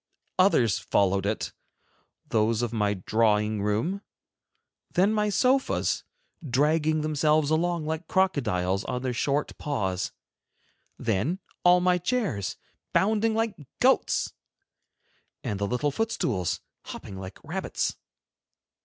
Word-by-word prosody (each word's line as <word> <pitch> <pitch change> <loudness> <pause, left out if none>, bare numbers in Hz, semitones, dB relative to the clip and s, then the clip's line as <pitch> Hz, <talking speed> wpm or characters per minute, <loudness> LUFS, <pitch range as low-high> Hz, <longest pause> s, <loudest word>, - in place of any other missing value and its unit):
Others 125 - +4
followed 100 0 +1
it, 105 - -2 0.7
those 110 +1 +1
of 120 -1 -2
my 105 -2 +1
drawing 105 +1 +1
room, 110 - 0 0.9
then 195 +4 +3
my 210 -1 +1
sofas, 260 +6 +2 0.4
dragging 155 +3 +2
themselves 155 0 +2
along 170 0 +1
like 160 +2 -3
crocodiles 105 - +1
on 125 0 -3
their 130 -1 -1
short 140 +4 0
paws; 95 -10 -1 0.9
then 115 - 0 0.3
all 180 0 +6
my 180 0 +3
chairs, 180 - -1 0.4
bounding 220 +2 +2
like 225 -1 +1 0.3
goats, - - +2 1.1
and 100 - -2
the 100 - 0
little 125 +6 0
foot 225 +9 -1
stools, 95 - -1 0.2
hopping 95 - -8
like 95 0 -8
rabbits. - - -2
145 Hz, 110 wpm, -27 LUFS, -, 1.1 s, all